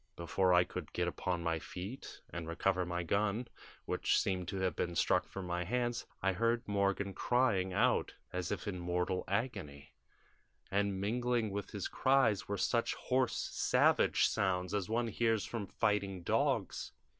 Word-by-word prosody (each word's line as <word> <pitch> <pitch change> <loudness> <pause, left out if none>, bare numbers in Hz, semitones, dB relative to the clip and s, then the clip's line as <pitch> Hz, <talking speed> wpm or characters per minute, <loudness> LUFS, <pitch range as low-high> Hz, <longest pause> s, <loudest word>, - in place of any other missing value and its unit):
"Before 90 +2 +1
I 90 0 +6
could - - -7
get - - 0
upon 90 -2 -2
my 85 -1 0
feet 95 - -8
and 85 -1 -5
recover 90 +2 0
my 90 0 -2
gun, 105 +6 0 0.4
which - - +2
seemed 90 -2 -1
to 95 - -4
have 95 -1 0
been 85 -1 -2
struck - - +2
from 95 -1 -6
my 90 0 -1
hands, 120 +4 -1 0.2
I 95 0 +3
heard 115 +4 0
Morgan 100 -1 0
crying 110 -6 +2
out 120 +6 +2 0.2
as 90 -1 -2
if 105 0 -3
in 95 -3 -3
mortal 90 +1 -1
agony, 90 - -3 0.8
and 100 -1 +1
mingling 120 +1 0
with 100 +1 -4
his 100 -3 -3
cries 130 -7 +2
were 100 - -2
such 115 +5 +1
hoarse 130 -1 0
savage - - +3
sounds 90 -1 0
as 105 -1 -1
one 115 +1 +1
hears 115 -1 +1
from 110 -4 -4
fighting 100 -4 0
dogs. - - 0
100 Hz, 160 wpm, -34 LUFS, 90-115 Hz, 0.8 s, I